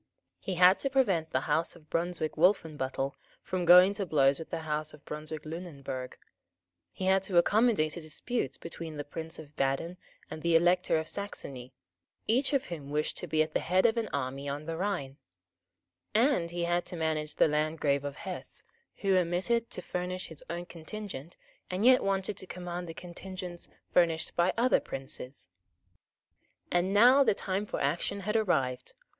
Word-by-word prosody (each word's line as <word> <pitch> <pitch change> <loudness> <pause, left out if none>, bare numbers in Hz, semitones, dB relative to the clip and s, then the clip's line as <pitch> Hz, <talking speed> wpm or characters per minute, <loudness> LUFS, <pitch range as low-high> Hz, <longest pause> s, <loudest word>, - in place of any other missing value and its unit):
He 190 - -3
had 180 +2 +6
to 275 - -1
prevent 200 - +2
the - - 0
House 160 +3 0
of 155 -3 -17
Brunswick 165 -2 -1
Wolfenbuttel 150 -6 +1 0.3
from 185 -1 -2
going 180 +3 +8
to 200 -1 -3
blows 140 -3 +3
with 160 - -8
the 165 - -3
House 155 0 -3
of 150 - -22
Brunswick 155 0 -6
Lunenburg; 145 -6 -6 0.7
he 190 - -5
had 190 0 +4
to 190 -2 -1
accommodate 205 -4 +3
a - - -5
dispute 155 - -3
between 165 -2 -7
the 145 - -3
Prince 160 +3 -7
of 150 -1 -12
Baden 135 +6 -1 0.3
and 155 - -7
the 170 0 +2
Elector 175 0 +4
of 160 0 -2
Saxony, 135 -11 -5 0.5
each 255 +6 +2
of 275 -3 +1
whom 150 -5 -7
wished 150 +1 -1
to 180 - -5
be 155 0 +3
at 155 0 -8
the - - +2
head 185 +2 +2
of 225 -1 +4
an 230 -2 -1
army 140 +1 -3
on 145 +2 -4
the 165 0 -3
Rhine; 170 -7 -2 1.0
and 230 -7 +3
he 170 0 -3
had 175 +1 +1
to - - -6
manage 155 -2 -1
the - - +5
Landgrave 150 -2 +1
of 145 -1 -4
Hesse, 185 +3 -7 0.4
who 195 -2 +3
omitted 185 +7 +1
to 180 - -5
furnish 180 +1 -4
his 160 -3 -7
own 175 +1 -4
contingent, 170 -2 -8 0.3
and 185 +4 -1
yet 255 0 +7
wanted 195 +1 0
to 190 - -8
command 175 -1 -5
the 165 - -7
contingents 180 0 -8 0.2
furnished 165 -2 +2
by 175 +2 +3
other 245 +2 +4
princes. 135 -4 -8 1.2
And 175 +2 +2
now 245 +7 +7
the 230 - +3
time 195 +2 -2
for - - -3
action 200 +3 -1
had 210 +3 -2
arrived. 135 - 0
170 Hz, 175 wpm, -30 LUFS, 155-190 Hz, 1.2 s, going